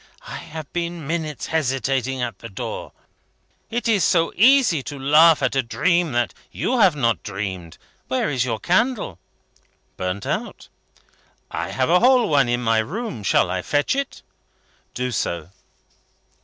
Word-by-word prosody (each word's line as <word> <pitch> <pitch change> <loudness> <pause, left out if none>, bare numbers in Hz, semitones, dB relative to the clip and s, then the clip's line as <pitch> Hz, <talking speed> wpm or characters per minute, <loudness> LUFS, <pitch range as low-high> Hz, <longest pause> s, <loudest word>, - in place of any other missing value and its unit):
I - - -6
have 155 -2 -9
been 170 -2 -3
minutes 155 -2 -3
hesitating 135 -3 -1
at 115 -6 -4
the 115 - -9
door. 95 - -6 0.8
It 240 +2 -2
is 210 -6 +3
so 165 0 +2
easy 235 - +5
to 145 +2 -7
laugh 150 +4 +5
at - - +1
a 135 - +3
dream 170 +7 +1
that 120 0 0 0.2
you 255 0 -1
have 190 -7 +5
not 115 - +1
dreamed. 95 -5 -5 0.3
Where 130 - 0
is 130 -5 0
your 115 -3 -2
candle?" 190 - 0 0.8
"Burnt 90 +2 -3
out." - - -4 0.8
"I - - -3
have 130 +3 0
a 180 - +6
whole 250 -1 +5
one 140 -4 +3
in 120 0 0
my 115 -1 +3
room. 170 - -4
Shall 95 -2 +2
I 90 0 -1
fetch 145 - 0
it?" 275 0 -4 0.7
"Do 125 0 -2
so." 85 -6 -3
140 Hz, 155 wpm, -22 LUFS, 115-175 Hz, 0.8 s, a